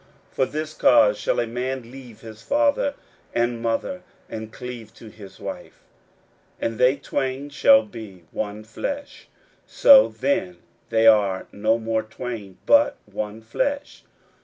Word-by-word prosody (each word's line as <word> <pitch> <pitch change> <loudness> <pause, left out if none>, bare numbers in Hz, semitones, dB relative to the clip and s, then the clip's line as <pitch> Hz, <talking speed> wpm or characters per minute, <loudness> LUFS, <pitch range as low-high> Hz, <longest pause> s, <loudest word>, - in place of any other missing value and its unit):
41:010:007 - - -31
For 130 - +3
this 155 +1 -5
cause 105 -7 +5
shall - - 0
a 120 - +1
man 125 +1 -4
leave 125 -4 -12
his 110 -1 -11
father 285 0 +1 0.4
and 120 0 0
mother, 115 +10 -2 0.3
and 110 0 -7
cleave 120 -3 -8
to 115 - -12
his 105 -3 -13
wife; - - -8 0.8
41:010:008 - - -3
And 115 - -8
they 125 +2 +5
twain 135 +1 -3
shall 275 - +5
be 105 - -11
one 105 0 -4
flesh: 280 - -6 0.4
so - - +7
then 185 -10 -1 0.3
they 115 0 +2
are 100 -4 +4
no 110 +2 +1
more 110 -1 -1
twain, 110 -3 -7
but 285 0 +4
one 105 +1 -6
flesh. 280 - -3
120 Hz, 145 wpm, -23 LUFS, 110-155 Hz, 0.8 s, so